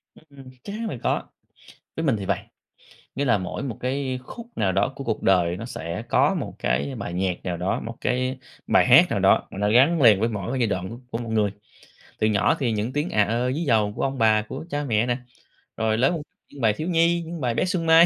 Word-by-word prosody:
Ưm, - - -18
ừm, 135 -2 -13
chắc 200 - -7
chắn 225 +1 -3
là 130 - -5
có! - - 0 0.7
Với 160 - -2
mình 135 -7 +2
thì 100 - -5
vầy, - - +1 0.8
nghĩa 140 - -1
là 120 -5 +3
mỗi 95 +6 -5
một 125 -6 -4
cái 130 0 -2
khúc 235 - -9
nào 100 -3 +1
đó 100 +7 +1
của 140 - -6
cuộc 115 -3 -2
đời 90 -2 +3
nó 110 - -7
sẽ 85 -5 -5
có - - +3
một - - -4
cái 65 +4 -1
bài 85 - -5
nhạc 90 -1 -2
nào 90 -2 -2
đó 90 +3 -1
một 115 +1 -7
cái 130 +1 -1 0.3
bài - - +4
hát - - +8
nào - - 0
đó - - +3
mà - - -8
nó 105 0 +1
gắn 140 +8 +4
liền 110 -5 +7
với 115 - +2
mỗi 105 -2 -4
cái 135 - -1
giai 120 - +3
đoạn 95 -3 -2
của 115 - -8
của 115 - -3
một 115 -1 -6
người. 105 -2 +2 0.7
Từ 110 - +3
nhỏ 105 -2 +2
thì 125 -5 0
những 110 +3 -2
tiếng 150 +4 -1
à 105 - +3
ơ 120 +4 0
ví 160 +5 -2
dầu 110 -7 +2
của - - -4
ông 135 0 -1
bà, 110 -2 +4
của 135 +8 -7
cha 145 -1 -2
mẹ 115 -4 +1
nè, 120 0 0 0.6
rồi 110 0 +1
lớn 135 +7 +2 0.3
những 140 - -11
bài 110 -2 +4
thiếu 155 +10 -5
nhi, 170 0 +3
những 165 -1 -7
bài 120 -2 0
bé 115 - +1
Xuân 180 -3 -1
Mai, 165 +1 +7
115 Hz, 255 wpm, -24 LUFS, 105-140 Hz, 0.8 s, hát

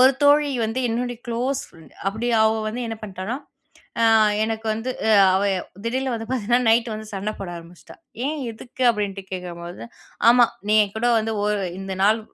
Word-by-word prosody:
ஒரு 260 +2 +7
தோழி 290 +1 +5 0.2
வந்து 225 +4 -2
என்னுடைய 240 +1 -2
க்ளோஸ் 250 +4 -1
ஃப்ரெண்ட். 165 -1 -18
அப்பிடி 220 +5 -1 0.2
அவ 220 0 +2
வந்து 240 +3 -4
என்ன 225 -1 -4
பண்ணிட்டான்னா, 195 +3 -4 0.7
அ - - +5 0.4
எனக்கு 220 0 -3
வந்து 225 +4 -3 0.2
அ - - +4 0.2
அவ 195 - +2 0.4
திடீர்னு 260 +2 -1
வந்து 225 -1 -5
பார்த்தீங்கன்னா, 240 0 +1
நைட்டு 230 0 +2
வந்து 215 0 -7
சண்ட 200 +2 -3
போட 195 -3 -6
ஆரம்பிச்சிட்டா! 170 +1 -13 0.3
"ஏன், 305 +1 -2
எதுக்கு?" 245 +3 -8
அப்பிடின்ட்டு 200 -3 -3
கேட்கும்போது, 175 -1 -6 0.5
"ஆமா. 240 -1 +6 0.2
நீ 215 - +4
என்கூட 220 +4 -1
வந்து 220 0 -2
ஒரு 210 -1 0 0.2
இந்த 195 0 -5
நாள் 215 +2 +4
225 Hz, 170 wpm, -23 LUFS, 200-245 Hz, 0.7 s, ஒரு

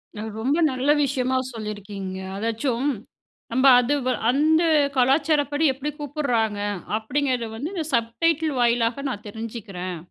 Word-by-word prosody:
அது 220 +1 -5
ரொம்ப 280 +7 +1
நல்ல 260 +3 -1
விஷயமா 260 -1 0 0.2
சொல்லியிருக்கீங்க. 205 -3 -6 0.2
அதாச்சும் 230 +5 -1 0.6
நம்ப 260 +3 +3
அதுவ் 260 +1 0 0.2
"அந்த 310 +5 +3 0.3
கலாச்சாரப்படி 290 +3 +2
எப்படி 275 +3 -4
கூப்பிடுறாங்க? 245 -8 -1 0.4
அப்படீங்கிறத 250 +1 -1
வந்து 285 - -4
இந்த 325 -5 -3
சப்டைட்டில் 300 +7 +1
வாயிலாக 235 +2 +1
நான் 210 -3 -6
தெரிஞ்சுக்கிறேன்." 205 -5 -6
250 Hz, 115 wpm, -24 LUFS, 225-290 Hz, 0.6 s, நம்ப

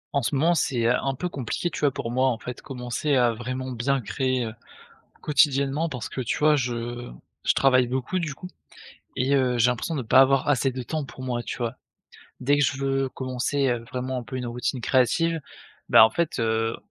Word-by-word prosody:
En 140 - +3
ce 120 +4 -1
moment 160 +6 +3
c'est, 130 -7 0
heu, 120 +2 +4
un 135 +1 -1
peu 180 - -3
compliqué, 140 +3 -3
tu - - -5
vois? 145 -2 +2
Pour 120 -3 -5
moi, 130 +2 +2
en 120 - -1
fait, 125 +1 -8
commencer 130 +2 -2
à 120 -2 +4
vraiment 130 +3 -5
bien 130 +3 0
créer, 130 +1 -1
heu, 110 - -6 0.7
quotidiennement 145 +1 +2
parce 125 -6 -5
que, 130 - -5
tu 120 - -2
vois? 150 0 +4
Je 120 -2 -3 0.3
je - - +3
travaille 130 -2 +4
beaucoup, 130 +9 -2
du 160 -5 -3
coup 180 - -9 0.7
et 130 +2 +1
heu, 130 -2 +2
j'ai 120 +2 +5
l'impression 125 +7 -2
de 140 - -1
pas 125 +2 +4
avoir 135 0 +3
assez 135 -1 +2
de 130 0 -5
temps 155 +4 -3
pour 130 0 -11
moi, 120 -2 -2
tu - - -5
vois? 120 -2 -3 0.7
Dès 145 +3 +2
que 145 - +3
je 130 +1 0
veux 135 0 0
commencer, 130 +2 -1
heu, 120 -1 -2
vraiment 130 0 -3
un - - -5
peu 120 +3 -7
une 125 -1 -4
routine 120 +2 -3
créative, 165 +8 +2 0.5
bah, 110 - +9
en 110 - +3
fait, 165 +5 -1
heu, 115 0 0
130 Hz, 215 wpm, -25 LUFS, 120-140 Hz, 0.7 s, bah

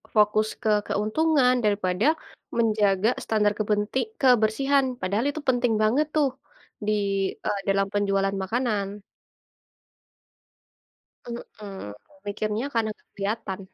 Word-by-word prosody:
fokus 215 0 +4
ke 220 - 0 0.2
keuntungan 255 +5 +2
daripada 200 0 +1 0.5
menjaga 210 -2 +3
standar 210 -2 +2
kepenti 210 +2 0 0.2
kebersihan, 265 +3 +3 0.2
padahal 200 +6 0
itu 310 +2 -4
penting 245 -2 +2
banget 250 +8 +3
tuh 290 -3 +4 0.6
di, - - +3 0.5
eee, 200 - 0
dalam 195 0 +2
penjualan 195 -1 +1
makanan. 215 -1 0 2.4
Heeh, 215 -4 -8 0.5
mikirnya 210 +3 -2
karena 225 -1 +1
nggak - - -35
kelihatan. 200 -1 -3
215 Hz, 100 wpm, -25 LUFS, 200-245 Hz, 2.4 s, fokus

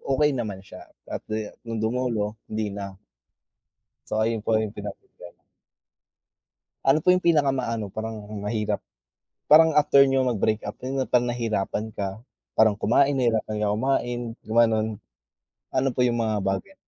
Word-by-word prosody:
okey 145 +2 +2
naman 105 -7 -4
siya, - - -12 0.2
at - - -3
de 110 -1 -3 0.2
no'ng 115 -1 -3
dumulo, 115 -3 -1 0.2
hindi 110 -1 -3
na. 100 -1 -6 1.1
So - - -1
ayun 115 0 0
po 110 +1 0
'yong 110 -1 0
pinoproblema. - - -10 1.4
Ano 135 +3 +4
po 180 - +2
'yong 180 0 +4
pinaka 150 -5 +4
ma-ano 115 -6 -2
parang 110 0 -6
mahirap? 105 -1 -1 0.7
Parang 160 +1 +7
after 145 -2 +6
niyo 135 -1 +2
mag-breakup 110 -3 0
'yon 130 +2 -3
'yong - - -20
parang 125 -1 +3
nahirapan 110 -3 -2
ka, 100 0 -4 0.4
parang 110 -1 +6
kumain, 135 +7 +3
nahirapan 110 -5 0
ka 105 - +1
kumain, 120 0 0 0.2
gumano'n. 110 -1 +2 0.9
Ano 135 - +2
po 125 - +3
'yong 120 -1 +1
mga 110 -1 0
bagay? 95 - -2
115 Hz, 145 wpm, -25 LUFS, 105-130 Hz, 1.4 s, Parang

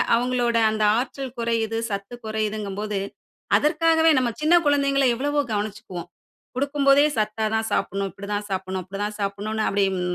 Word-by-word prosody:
அவுங்களோட 240 -1 +1
அந்த 215 0 -1
ஆற்றல் 260 +1 -4
குறையுது, 225 -1 0
சத்து 200 +4 -4
குறையுதுங்கம்போது, 210 -1 -2 0.6
அதற்காகவே 320 +1 +3
நம்ம 255 -2 +2
சின்ன 310 +3 +3
குழந்தைகள 280 -1 +3
எவ்வளவோ 290 +4 -1
கவனிச்சிக்குவோம். 205 -4 -5 0.5
கொடுக்கும்போதே 280 +1 +3
சத்தா 215 0 0
தான் 220 0 0
சாப்புட்ணும், 195 0 -1
இப்பிடி 200 +3 -10
தான் 205 0 -2
சாப்புட்ணும், 190 -1 -3
அப்பிடி 195 +2 -8
தான் 210 0 -5
சாப்புட்ணுன்னு 205 +2 -2
அப்பிடிம் 195 -2 +1
220 Hz, 135 wpm, -24 LUFS, 200-270 Hz, 0.6 s, அதற்காகவே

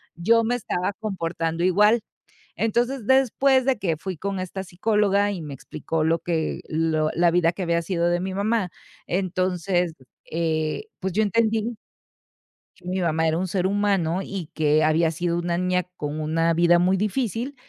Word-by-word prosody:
yo 230 +7 +3
me 245 +2 +1
estaba 190 -4 -2
comportando 170 -5 -2
igual. 210 +5 +4 0.6
Entonces, 235 +1 0
después 265 0 +3
de 265 -4 +1
que 170 -5 -1
fui 185 +2 -5
con 195 0 -3
esta 190 +1 -5
psicóloga 205 +2 +1
y 175 -4 -5
me 145 -2 -7
explicó 155 +4 -4
lo 165 +1 +2
que 160 -3 -2
lo 155 -1 +1
la 170 0 +4
vida 170 0 +3
que 185 - -6
había 170 0 +1
sido 170 -1 0
de 175 0 +1
mi 190 0 -3
mamá, 200 -2 0 0.4
entonces, 180 -1 0 0.4
eh, 160 - -1
pues 190 -1 -2
yo 220 - +3
entendí 225 +1 +1 1.0
que 180 -1 -14
mi 185 0 -1
mamá 160 -1 +1
era 160 +1 +1
un 185 - -1
ser 185 0 -1
humano, 195 -4 +1
y 180 -5 -6
que 155 0 +2
había 160 +1 +3
sido 170 +1 -1
una 170 0 -1
niña 180 0 +1
con 150 +1 -4
una 165 +2 +1
vida 175 +1 +4
muy 180 +2 +3
difícil, 230 +6 -2
180 Hz, 170 wpm, -24 LUFS, 165-205 Hz, 1.0 s, igual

